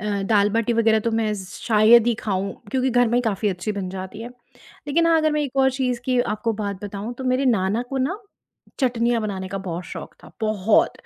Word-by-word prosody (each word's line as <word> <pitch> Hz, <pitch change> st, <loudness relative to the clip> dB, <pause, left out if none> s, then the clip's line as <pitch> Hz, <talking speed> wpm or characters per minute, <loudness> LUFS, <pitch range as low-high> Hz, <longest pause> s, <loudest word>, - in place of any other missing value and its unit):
अ, 205 Hz, -1 st, -2 dB
दाल-बाटी 210 Hz, +3 st, +2 dB
वग़ैरह 225 Hz, -1 st, +3 dB
तो 230 Hz, -, -1 dB
मैं 225 Hz, -1 st, 0 dB
शायद 220 Hz, +4 st, +4 dB
ही 240 Hz, -, +3 dB
खाऊँ, 195 Hz, -2 st, -2 dB, 0.2 s
क्योंकि 260 Hz, +1 st, +1 dB
घर 245 Hz, -1 st, +3 dB
में 230 Hz, -, -1 dB
ही -, -, +3 dB
काफ़ी 215 Hz, -2 st, 0 dB
अच्छी 190 Hz, +2 st, -3 dB
बन 200 Hz, -2 st, -4 dB
जाती 190 Hz, +3 st, -7 dB
है, 235 Hz, -, -6 dB, 0.6 s
लेकिन 335 Hz, +4 st, +2 dB
हाँ, 330 Hz, -1 st, +4 dB
अगर 310 Hz, -1 st, +2 dB
मैं 300 Hz, 0 st, +1 dB
एक 275 Hz, -2 st, -5 dB
और 265 Hz, 0 st, +4 dB
चीज़ 255 Hz, -2 st, -2 dB
की 255 Hz, -1 st, +2 dB
आपको 220 Hz, 0 st, -1 dB
बात 205 Hz, -2 st, -4 dB
बताऊँ, 205 Hz, +3 st, -5 dB
तो 260 Hz, +1 st, -7 dB
मेरे 255 Hz, +2 st, +1 dB
नाना 215 Hz, -2 st, +1 dB
को 270 Hz, -, -2 dB
ना 380 Hz, +5 st, -4 dB, 0.6 s
चटनियाँ 240 Hz, -2 st, +1 dB
बनाने 190 Hz, -3 st, -4 dB
का 195 Hz, +1 st, -4 dB
बहुत 180 Hz, -2 st, -5 dB
शौक -, -, -8 dB
था, -, -, -13 dB
बहुत, 215 Hz, -1 st, +2 dB
225 Hz, 215 wpm, -22 LUFS, 200-245 Hz, 0.6 s, शायद